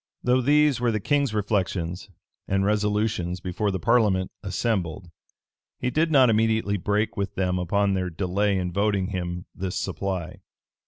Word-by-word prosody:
Though 125 +1 +3
these 145 0 +3
were 120 -1 +2
the 110 - -1
king's 140 +4 +1
reflections 95 -4 -2 0.4
and 95 0 +1
resolutions 105 -3 0
before 95 +4 -2
the 95 -1 -2
parliament 105 -4 +2
assembled, 90 -6 -2 0.7
he 125 - -2
did 160 +4 +2
not 135 -4 +6
immediately 110 -2 +2
break 105 +4 0
with 100 -3 -3
them 90 -1 0
upon 100 +3 +1
their 90 -1 -1
delay 95 +3 0
in 90 -1 -2
voting 100 -1 +1
him 90 -2 -4
this 95 -1 -4
supply. 95 -4 -3
100 Hz, 150 wpm, -25 LUFS, 90-110 Hz, 0.7 s, not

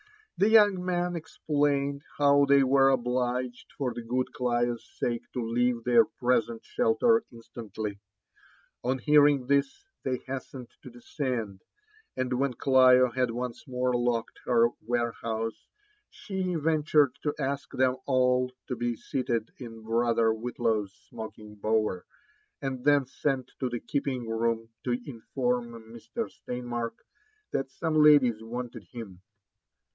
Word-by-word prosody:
The 205 - +3
young 205 -4 +5
man 175 -1 -1
explained 145 -3 -1 0.2
how 140 0 +5
they 140 0 +5
were 135 +1 +5
obUged 125 -1 -1
for 130 -4 -1
the 120 - -6
good 125 +2 -2
Clio's 120 -1 0
sake 120 -1 -2
to 120 -2 -2
leave 120 0 +1
their 120 -1 +6
present 120 -3 -1
shelter 225 - +2
instantly. 110 -3 -7 0.8
On 130 +2 0
hearing 145 -1 +4
this, 140 - 0 0.2
they 130 -1 -1
hastened 130 -1 -7
to - - -10
descend; 120 -5 -4 0.6
and 130 0 -1
when 130 0 0
Clio 130 -1 +5
had 125 0 0
once 125 +4 -5
more 125 0 0
locked 120 -1 -1
her 120 -1 +4 0.2
ware 120 -1 +1
house, 115 0 -4 0.4
she 185 -2 -4
ventured 150 -3 +3
to 150 -1 -1
ask 140 -1 -3
them 130 0 +1
alt 125 -1 +2
to 130 - -2
be 120 0 -1
seated 120 -2 -2
in 115 -3 -9
brother 115 0 +2
Wbiflaw's 110 -3 -1 0.2
smoking'bower, 110 -2 -3 0.5
and 130 -2 -4
then 145 -1 +4
sent 130 0 -2
to 130 - -1
the 120 -1 -3
keeping 130 -1 -3
room 115 0 -1 0.2
to 125 -1 0
inform 125 -1 -2 0.2
Mr. 120 - -5
Steinmark 120 -2 -5 0.5
that 135 - -2
some 160 +4 -3
ladies 145 -7 +5
wanted 120 -2 -6
him. 100 -7 -9
125 Hz, 130 wpm, -28 LUFS, 115-140 Hz, 0.8 s, their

